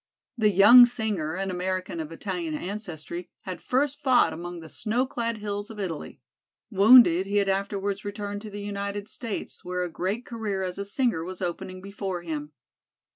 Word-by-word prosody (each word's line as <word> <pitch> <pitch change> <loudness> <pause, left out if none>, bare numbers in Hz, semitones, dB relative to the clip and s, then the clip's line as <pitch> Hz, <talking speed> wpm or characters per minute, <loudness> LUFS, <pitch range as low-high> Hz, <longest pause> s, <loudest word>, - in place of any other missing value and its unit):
The 220 -3 +3
young 235 +6 +9
singer, 210 -10 -2
an 195 0 -2
American 185 -1 -3
of 160 0 -5
Italian 170 -2 -4
ancestry, 175 -2 -6
had 185 -2 -7
first 275 +2 0
fought 255 -3 +4
among 175 +1 -6
the 160 - -10
snow 230 +9 0
clad 230 -3 -3
hills 205 0 -4
of 220 -2 -9
Italy. 175 -6 -5 0.5
Wounded, 200 -3 +7
he 205 +1 0
had 200 -1 +2
afterwards 200 +1 -1
returned 205 0 -5
to 215 - -8
the 205 0 -7
United 200 0 -4
States, 230 -2 -5
where 180 0 -2
a 175 - -4
great 195 +9 -2
career 215 -5 -3
as 185 +1 -4
a 200 - -3
singer 215 - 0
was 185 +1 -7
opening 185 +1 -4
before 195 -3 -4
him. 150 -3 -5
200 Hz, 175 wpm, -26 LUFS, 180-215 Hz, 0.5 s, young